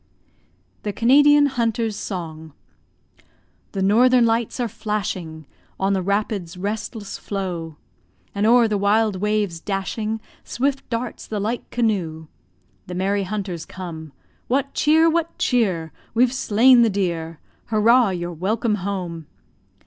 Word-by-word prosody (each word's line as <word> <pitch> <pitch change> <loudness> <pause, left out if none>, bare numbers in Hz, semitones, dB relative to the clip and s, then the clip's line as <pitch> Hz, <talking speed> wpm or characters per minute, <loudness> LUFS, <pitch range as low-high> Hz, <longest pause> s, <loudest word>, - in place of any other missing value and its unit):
THE 210 - -3
CANADIAN 290 +6 +5
HUNTER'S 230 -4 -1
SONG 160 -6 -6 1.2
The 195 -2 -1
northern 240 +5 +5
lights 230 +2 0
are 245 - 0
flashing, 185 -7 -4 0.3
On 195 +1 +1
the 190 - 0
rapids' 200 -2 -2
restless 205 +2 -5
flow; 175 -5 -4 0.6
And 205 +2 +1
o'er 235 0 +6
the 210 -2 -1
wild 210 0 +2
waves 205 -3 -1
dashing, 210 +3 -3 0.2
Swift 275 +2 -2
darts 235 0 -4
the 215 - -3
light 225 +4 -3
canoe. 185 -9 -1 0.6
The 180 - -6
merry 195 +2 0
hunters 185 -4 -4
come. 165 -4 -8 0.4
"What 275 +2 0
cheer? 315 +2 +4
what 330 0 0
cheer?" 185 - 0 0.2
"We've 245 +2 +3
slain 245 +1 +5
the 230 - +4
deer!" 170 -5 -2 0.3
"Hurrah! 225 +2 +4
You're 175 -2 -4
welcome 210 +6 0
home!" 175 -5 -4
205 Hz, 125 wpm, -22 LUFS, 180-235 Hz, 1.2 s, o'er